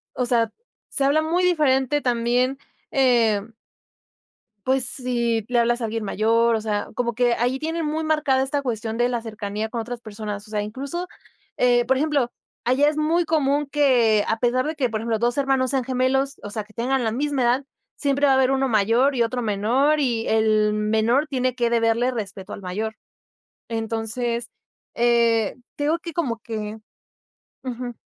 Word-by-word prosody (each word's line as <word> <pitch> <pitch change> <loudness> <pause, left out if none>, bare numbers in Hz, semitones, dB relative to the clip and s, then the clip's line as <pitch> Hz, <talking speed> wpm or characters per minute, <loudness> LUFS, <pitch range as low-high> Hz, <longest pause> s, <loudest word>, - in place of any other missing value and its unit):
O 250 - 0
sea, 230 -2 +1 0.4
se 275 - -1
habla 290 +3 +3
muy 335 +3 +1
diferente 290 -5 +2
también, 245 +1 +1 0.3
em 230 -5 +2 1.1
Pues 260 -1 +2
si, 235 -3 0
le 245 - +2
hablas 240 +1 +2
a - - -1
alguien 225 0 -3
mayor, 230 +3 +2
o - - -2
sea, 210 -1 -2
como 235 0 -1
que 240 0 +2
allí 245 +3 0
tienen 325 +3 -2
muy 310 +1 -1
marcada 305 -4 +2
esta 280 +2 -1
cuestión 225 -3 -3
de 240 +1 +2
la 240 -1 -1
cercanía 215 -1 -4
con 230 +1 -3
otras 240 +1 -6
personas. 210 -1 -7
O - - -14
sea, 210 -1 -1
incluso, 275 +12 -5 0.5
eh, 245 -1 +4
por 265 +2 +2
ejemplo, 285 -5 0 0.3
allá 260 +4 +3
es 300 - -1
muy 325 +3 +1
común 295 -2 +1
que 250 -7 +3
a 225 - 0
pesar 250 +3 +1
de 310 - -2
que 275 -5 0
por 220 -1 -3
ejemplo 225 -1 -1
2 240 +2 0
hermanos 270 -2 +1
sean 265 -2 0
gemelos, 265 +2 0
o - - -6
sea, 215 0 -4
que 215 - -21
tengan 250 +3 0
la 220 - 0
misma 280 +2 -1
edad, 245 +3 +2 0.3
siempre 280 -1 0
va 280 - +5
a - - +4
haber 265 0 +3
uno 270 0 +1
mayor 230 +6 +3
y 240 - +2
otro 245 +2 -1
menor, 240 +8 +2
y 235 -5 0
el 215 -1 +3
menor 220 +6 +1
tiene 255 -3 -1
que 240 -2 +1
deberle 235 +1 +2
respeto 200 -5 -6
al 200 - -10
mayor. 215 +4 -4 0.7
Entonces, 230 +1 -2 0.5
eh, 235 -2 +2 0.2
tengo 300 +3 0
que 335 -1 -8
como 255 -10 -2
que 220 -2 -5 0.9
Ujú. 250 -1 -5
240 Hz, 180 wpm, -23 LUFS, 225-270 Hz, 1.1 s, va